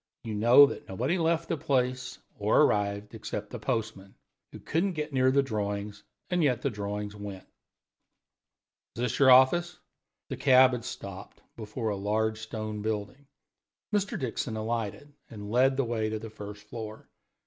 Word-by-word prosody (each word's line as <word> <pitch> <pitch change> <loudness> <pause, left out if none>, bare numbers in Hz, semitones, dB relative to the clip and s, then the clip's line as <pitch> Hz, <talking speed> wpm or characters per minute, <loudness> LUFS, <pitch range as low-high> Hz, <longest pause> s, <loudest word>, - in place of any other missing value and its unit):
You 115 -2 -5
know 120 +7 +7
that 140 - -6
nobody 130 - -1
left 165 0 +1
the 165 - -1
place 125 -2 -1 0.2
or - - +4
arrived, 100 0 0
except 105 -1 -6
the 120 - -6
postman, 105 -2 -3 0.4
who - - -9
couldn't 180 +4 -1
get 150 -2 -4
near 130 -1 +4
the 140 +1 +3
drawings, 105 -3 -3 0.3
and 180 -1 +2
yet 125 -6 +1
the 140 - 0
drawings 105 0 -4
went. 100 -2 -8 1.5
Is 115 - -5
this 125 -1 -1
your 135 -2 +6
office?" 130 +7 +5 0.5
The - - -4
cab 130 -1 +6
had 125 -1 -4
stopped 100 -5 -8
before 110 +1 -4
a 105 - -1
large 110 +2 0
stone 110 -1 -5
building. 110 +6 -4 0.7
Mr. 205 -1 0
Dixon 125 -2 -3
alighted 115 +5 -4 0.2
and 105 -2 -8
led 130 +3 +3
the 135 - +1
way 110 -2 -1
to 110 - -2
the 110 0 -8
first 105 -1 -9
floor. 110 0 -8
110 Hz, 160 wpm, -28 LUFS, 105-130 Hz, 1.5 s, know